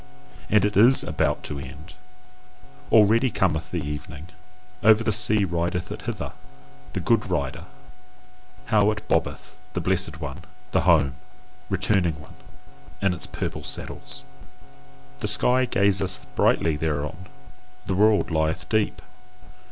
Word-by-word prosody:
And 105 -1 +4
it 105 - -1
is 120 +7 +7
ABOUT - - -1
TO 70 - -5
end. 75 +5 -10 1.0
Already 115 +4 +5
cometh 80 -6 0
the 85 -4 -3
evening: 75 +2 -7 0.5
over 110 +1 +5
the 110 - +1
sea 105 0 +3
rideth 90 +1 -2
it - - -6
hither, - - -5 0.6
the - - -2
good 110 +4 +1
rider! 70 -7 -2 1.1
How 105 -1 +5
it 105 0 -4
bobbeth, - - -1 0.2
the 90 - -1
blessed 90 -3 0
one, 75 -2 -6 0.3
the - - +2
home 75 -6 +4 0.6
returning 95 -4 +1
one, 75 - -14 0.7
in 95 -1 +1
its 90 - -6
purple - - -5
saddles! 65 - -6 0.9
The - - -2
sky 130 +1 +2
gazeth 100 -4 +1
brightly 80 -3 +2
thereon, 80 +4 -3 0.6
the - - -1
world 105 0 +3
lieth 80 0 0
deep. 110 -1 0
95 Hz, 130 wpm, -24 LUFS, 80-105 Hz, 1.1 s, is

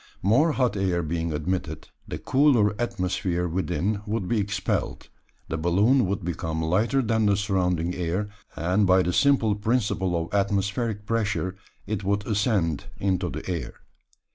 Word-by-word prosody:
More 135 - +4
hot 125 -6 +1
air 90 -3 0
being 80 +1 -2
admitted, 85 +5 -3 0.2
the - - -4
cooler 130 -7 +3
atmosphere 90 -5 -1
within 90 +3 -1
would 105 -3 -2
be 115 +1 +1
expelled, 105 +1 -2 0.4
the 80 - -3
balloon 100 +9 +3
would 95 -2 -2
become 80 -2 -3
lighter 105 +12 +1
than 110 -1 +2
the 100 -1 +3
surrounding 90 -4 0
air, 90 +3 -2 0.3
and 90 +5 +1
by 95 0 +5
the 90 - -1
simple 135 -5 +3
principle 105 -4 0
of 85 +3 -6
atmospheric 100 +2 0
pressure 105 -4 -1 0.3
it 105 -2 -3
would 100 +1 0
ascend 100 - 0
into 95 -2 0
the 75 +1 -6
air. 90 -3 -4
95 Hz, 145 wpm, -25 LUFS, 90-110 Hz, 0.4 s, by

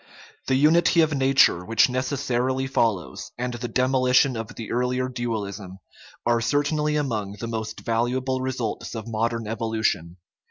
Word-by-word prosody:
The 130 - +2
unity 165 +4 +4
of 155 -1 +2
nature 135 -9 +4
which 115 +3 +3
necessarily 130 0 -1
follows, 115 -8 -1
and 125 0 -3
the 120 0 -4
demolition 130 +1 +3
of 115 -1 -6
the 115 - -7
earlier 125 +1 0
dualism, 105 -6 -4 0.5
are 120 -1 +2
certainly 150 +4 +1
among 110 -9 -2
the 105 +3 -7
most 110 -1 -5
valuable 125 +3 -1
results 125 -4 -3
of 110 0 -6
modern 115 0 -1
evolution. 110 -6 -2
120 Hz, 135 wpm, -24 LUFS, 110-130 Hz, 0.5 s, unity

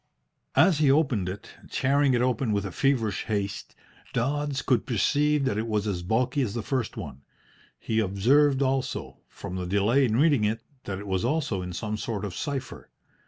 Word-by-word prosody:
As 180 -6 +5
he 150 -3 +4
opened 135 - +2
it, 95 +2 -8 0.2
tearing 140 0 +2
it 120 - +2
open 125 -2 0
with 100 -1 0
a 95 - -4
feverish 115 -3 0
haste, 100 -3 -3 0.4
Dodds 140 +3 -1
could 125 - +1
perceive 145 +6 +2
that 105 -5 0
it 110 - -2
was 105 -2 0
as 95 -4 -2
bulky 125 +9 0
as 115 -4 -2
the 115 - -3
first 130 -4 -2
one. 65 - -7 0.6
He 110 0 -1
observed 130 +8 +3
also, 135 0 -2
from 90 - -7
the 90 -1 -3
delay 105 +8 +3
in 110 -3 0
reading 145 -5 +4
it, 110 +2 -1 0.2
that 95 - -4
it 100 - -8
was 95 -2 -1
also 145 -11 0
in 90 0 -5
some 105 +4 -3
sort 105 -1 -3
of 95 -3 -6
cipher. 140 -3 -5
115 Hz, 185 wpm, -26 LUFS, 100-140 Hz, 0.6 s, As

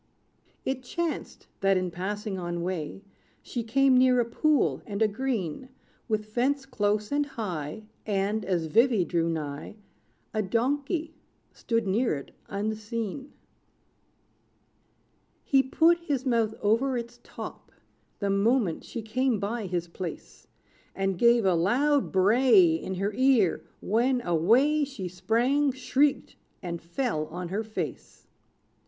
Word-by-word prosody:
It 265 -1 -1
chanced, 330 +6 -4
that, 195 -1 +3
in 185 -1 -1
passing 195 +2 -4
on 175 -1 -3
way, 180 +1 -4 0.4
She 240 - -4
came 265 +4 +3
near 255 0 +5
a 240 - +2
pool, 295 +5 +1
and 200 -2 -4
a 220 - +4
green 225 - -3 0.4
With 215 -2 -1
fence 260 +6 0
close 210 -4 -1
and 290 +1 +2
high; 185 - -5 0.2
And, 205 +1 0
as 180 -4 0
Vivy 220 +2 +3
drew 170 -1 0
nigh, 150 +3 -4 0.6
A 215 - +1
donkey 285 - -1 0.4
stood 230 -2 -1
near 205 0 +1
it 140 - -8 0.2
unseen. 220 +5 -4 2.1
He 270 -1 +4
put 325 +6 +3
his 285 -6 -2
mouth 230 -4 +1
over 240 +5 +2
its 240 0 -7
top, - - -9 0.5
The 200 -1 -1
moment 200 -2 +1
she 230 - -6
came 235 +1 0
by 210 +1 -3
his 175 -1 -2
place; 170 0 -8 0.5
And 195 0 0
gave 235 +2 +4
a 190 - +4
loud 260 - +2
bray 200 -2 +5
In 185 +3 -3
her 200 +3 -1
ear, 255 -7 +3 0.2
when, 245 +5 +2
away 235 - +3
She 265 -10 -5
sprang, 235 +11 +1
shrieked, 265 +3 0 0.3
and 170 -2 -4
fell 170 - -2
on 175 +1 -6
her 205 +4 -2
face. 220 0 -6
220 Hz, 130 wpm, -27 LUFS, 190-260 Hz, 2.1 s, near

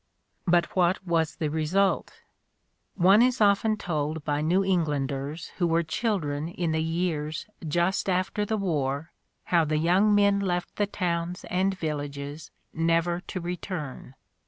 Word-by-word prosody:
But 170 0 +2
what 185 +1 +2
was 165 -3 +1
the 155 -2 -2
result? 170 +6 0 0.7
One 195 +4 +6
is 255 +1 +3
often 215 +1 +3
told 155 -4 -3
by 145 -1 0
New 180 +5 +2
Englanders 150 -3 -1
who 175 - +3
were 165 0 +2
children 160 -4 -1
in 170 -1 -2
the 160 0 +1
years 160 -2 -2 0.2
just 175 +6 +1
after 185 +3 0
the 220 +1 -1
war 150 -5 -1 0.4
how 170 -1 +6
the 155 0 0
young 185 +6 +4
men 200 -1 +4
left 180 -3 -2
the 205 - +1
towns 175 -3 -2
and 190 +1 +1
villages 145 -2 -5 0.2
never 165 +1 +1
to 185 - -4
return. 170 -6 -5
170 Hz, 140 wpm, -27 LUFS, 155-190 Hz, 0.7 s, One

